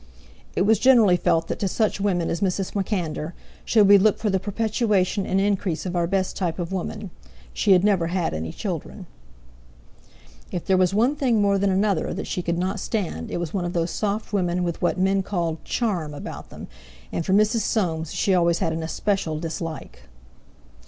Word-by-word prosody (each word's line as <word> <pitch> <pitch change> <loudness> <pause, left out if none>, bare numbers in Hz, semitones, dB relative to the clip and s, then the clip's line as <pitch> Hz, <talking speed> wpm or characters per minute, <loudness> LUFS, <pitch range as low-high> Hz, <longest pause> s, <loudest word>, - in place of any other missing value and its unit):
It - - +2
was 215 0 +3
generally 230 -8 +6
felt 165 -1 +1
that - - -4
to 200 - 0
such 210 +1 0
women 180 -4 0
as 170 - -3
Mrs. 190 -1 -1
MacAnder 175 -5 -2 0.3
should 215 -3 +4
we 200 0 +8
look 210 +1 +3
for 215 -2 -1
the 190 - +1
perpetuation 205 -1 0
and 190 - +1
increase 195 -4 0
of 180 -1 -3
our 170 -1 +1
best 190 +1 -1
type 175 -4 -2
of 175 -1 -4
woman. 185 -2 -4 0.4
She 195 - +3
had 180 0 +4
never 195 -5 +2
had 175 -1 -1
any 80 +1 -4
children. - - -5 1.5
If 175 - -4
there 190 - +3
was 185 -1 +3
one 245 +7 +3
thing 250 -6 +1
more 200 -1 +3
than 200 0 +2
another 195 -2 +1
that 195 - -4
she 180 - -3
could 170 0 -2
not 190 +3 -1
stand 180 - -3
it - - -3
was 170 -3 -4
one 190 -3 -1
of 175 0 -3
those 170 -1 0
soft 210 +1 -2
women 180 -2 0
with 170 -1 -3
what 175 - +1
men 195 +1 +2
called 170 -5 -3
"charm" 175 -11 -2
about - - -8
them, - - -9 0.5
and 170 - -2
for 190 - 0
Mrs. 215 +3 +3
Soames 165 -7 -1
she 195 - +1
always 170 -2 +3
had 160 - -1
an 165 - -3
especial 165 -1 -1
dislike. 165 - -6
185 Hz, 195 wpm, -24 LUFS, 170-205 Hz, 1.5 s, we